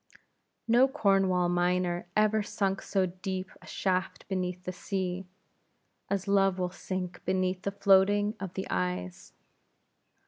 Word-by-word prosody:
No 240 +3 +6
Cornwall 195 -9 +2
miner 175 0 0
ever 215 0 +3
sunk 195 -1 -1
so 190 -2 +1
deep 185 +1 -5
a - - -15
shaft 185 -1 -2
beneath 180 -1 -2
the 185 - -3
sea, 185 0 -3 0.8
as 200 0 -1
Love 195 -1 +3
will 180 -1 -1
sink 185 -1 -5
beneath 185 0 0
the 200 - -1
floatings 200 +1 +4
of 190 -2 -6
the 190 - -3
eyes. 90 -7 -3
185 Hz, 130 wpm, -29 LUFS, 180-195 Hz, 0.8 s, No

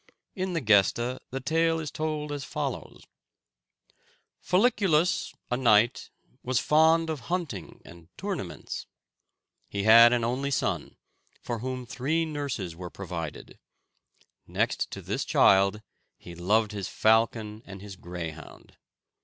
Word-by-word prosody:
In 185 -1 -2
the 165 - -1
"Gesta" 120 +3 +3
the 135 - -4
tale 165 +4 +1
is 155 -3 -5
told 155 -1 -3
as 145 -1 -4
follows: - - -5 1.4
"Folliculus, 185 -5 +2 0.2
a 125 - +1
knight, 120 -1 +3 0.3
was 125 -1 0
fond 160 +2 +4
of 155 - -4
hunting 165 - -4
and 85 -1 -14
tournaments. 185 - -5 0.8
He 100 0 -3
had 115 +2 +8
an 120 -1 +1
only 130 +4 -1
son, 140 - -2 0.5
for 120 -2 -3
whom 130 +1 -4
three 155 +7 -1
nurses 140 - -4
were 90 +1 -7
provided. 85 -5 -7 0.9
Next - - -1
to - - -8
this - - -2
child, 100 +2 +4 0.3
he 85 - -11
loved 105 +6 +1
his 100 -3 -4
falcon 110 -1 +1
and 100 0 -10
his 100 -2 -9
greyhound. 85 -4 -9
120 Hz, 125 wpm, -27 LUFS, 100-155 Hz, 1.4 s, had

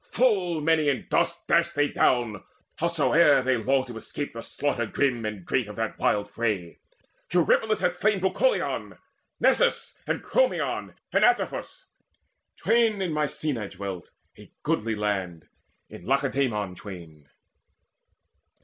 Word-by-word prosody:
Full 190 -10 +2
many 155 -1 +3
in 135 -5 -1
dust - - 0
They - - +5 0.3
dashed - - -11
down, 115 -6 +1 0.4
howsoe'er 150 -3 +4
they 130 0 +2
longed 130 +3 +1
to 120 -3 -8
escape. 145 +5 -6
The 115 - -6
slaughter 120 -2 -2
grim 125 -1 0
and 105 -4 -6
great 125 -4 0
of 105 - -9
that 115 -1 -3
wild 105 0 +1
fray. 105 -6 -3 0.5
Eurypylus 195 +5 +2
hath 180 0 0
slain 215 +1 +2
Bucolion, 340 - 0 0.4
Nesus, - - +2
and - - -2
Chromion - - 0 0.2
and - - +3
Antiphus; 365 0 0 0.7
Twain 225 -3 +2
in 180 -4 -1
Mycenae 150 -6 -2
dwelt, 95 -2 -7 0.3
a - - -15
goodly 110 0 0
land; 95 -6 -3 0.4
In - - -12
Lacedaemon 130 -8 0
twain. 85 -7 -11
130 Hz, 130 wpm, -26 LUFS, 105-170 Hz, 0.7 s, They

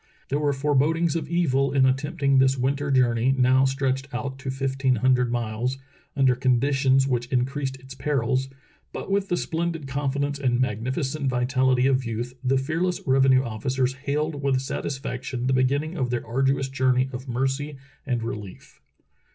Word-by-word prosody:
There 140 - 0
were 145 -1 +1
fore 145 +2 -1
bodings 160 +4 +2
of 155 -3 -3
evil 140 -6 +1
in 135 -1 +4
attempting 140 +1 +1
this 130 0 +3
winter 140 +3 -1
journey 125 -1 +3
now 130 +1 +4
stretched 135 0 -1
out 130 +2 -4
to 135 -1 -5
fifteen 135 -1 0
hundred 125 +1 +2
miles, 120 +2 -2 0.4
under 135 -2 +4
conditions 135 +1 +2
which 120 -2 -1
increased 130 +2 -1
its 130 +1 -11
perils. 135 -2 -1 0.4
But - - -6
with 200 0 0
the 175 - +1
splendid 165 -3 -3
con 140 +1 -1
fidence 140 0 -2
and 125 -2 +2
magnificent 130 +4 -1
vitaHty 130 +1 +2
of 130 -1 +2
youth, 120 +1 -4
the 135 +1 +2
fearless 165 +7 -1
revenue 130 -1 +4
officers 130 +3 -1
hailed 145 +2 -2
with 135 -2 +1
satisfaction 130 -2 -4
the 130 - +2
beginning 140 +6 +1
of 125 -2 0
their 120 -1 -2
arduous 135 +3 +1
journey 130 -1 +1
of 130 +2 -6
mercy 135 +4 -2 0.3
and 120 -4 -2
relief. 105 -4 -8
135 Hz, 160 wpm, -25 LUFS, 125-140 Hz, 0.4 s, in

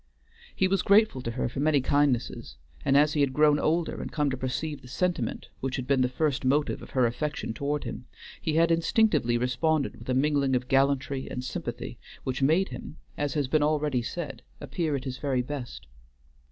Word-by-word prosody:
He 190 - +3
was 195 +1 +1
grateful 200 - +4
to 115 - -4
her 115 - -2
for 125 - -5
many 150 0 +3
kindnesses; 130 - 0 0.3
and 135 - +4
as 150 +1 +4
he 150 - +1
had 140 -2 +2
grown 150 +1 +4
older 165 +1 0
and - - -6
come 150 -3 0
to - - -1
perceive 135 +4 -3
the - - -13
sentiment 160 -3 -2
which 130 -1 -2
had 130 - -3
been 135 0 +2
the 125 - +2
first 145 +1 0
motive 145 +3 +1
of - - -10
her 130 -2 +2
affection 130 0 -2
toward 145 +4 -2
him, 120 0 -7 0.3
he 155 - -1
had 165 +1 +4
instinctively 165 - +2
responded 135 +5 0
with - - -11
a 130 - +2
mingling 140 -1 +2
of 125 0 -1
gallantry 135 0 +1
and 125 - -4
sympathy 130 - -5 0.2
which 130 +1 -3
made 160 +8 +3
him, 155 - -8 0.2
as 145 0 -2
has 145 -3 +1
been 155 +3 +2
already 150 -3 +1
said, 135 -1 -5 0.2
appear 160 -4 -2
at 135 - -3
his 130 -1 -5
very 130 -4 0
best. 130 -2 -6
140 Hz, 200 wpm, -27 LUFS, 130-155 Hz, 0.3 s, grateful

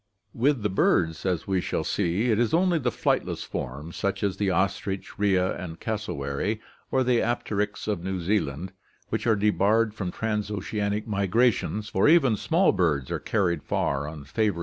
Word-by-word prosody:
With 130 -1 +1
the 105 - +1
birds, 85 -2 +2
as 90 -3 -1
we 95 -2 0
shall 80 - -2
see, 100 +6 0
it 110 - +2
is 120 +5 +2
only 175 -1 +3
the - - 0
flightless - - -1
forms, 75 +6 -5
such 100 +1 -2
as 100 -2 0
the 100 -2 +1
ostrich, 95 +2 -1
rhea, 95 -3 +2
and 80 -3 -7
cassowary, 105 -2 -2 0.3
or 130 - +2
the 125 -1 +3
apteryx 105 -3 -2
of 100 -5 -1
New 95 0 -2
Zealand, 90 -2 -1 0.4
which - - -2
are 110 - +5
debarred 105 +1 +2
from 100 -4 -3
trans 105 -1 -2
oceanic 105 +1 -2
migrations, 105 +1 +1
for 95 +9 +3
even 145 -9 +5
small 170 - +3
birds 75 -7 0
are - - -1
carried 90 -7 0
far 70 +1 -1
on 75 -1 -7
favoring 105 +9 0
gales. - - -6
100 Hz, 175 wpm, -26 LUFS, 90-110 Hz, 0.4 s, are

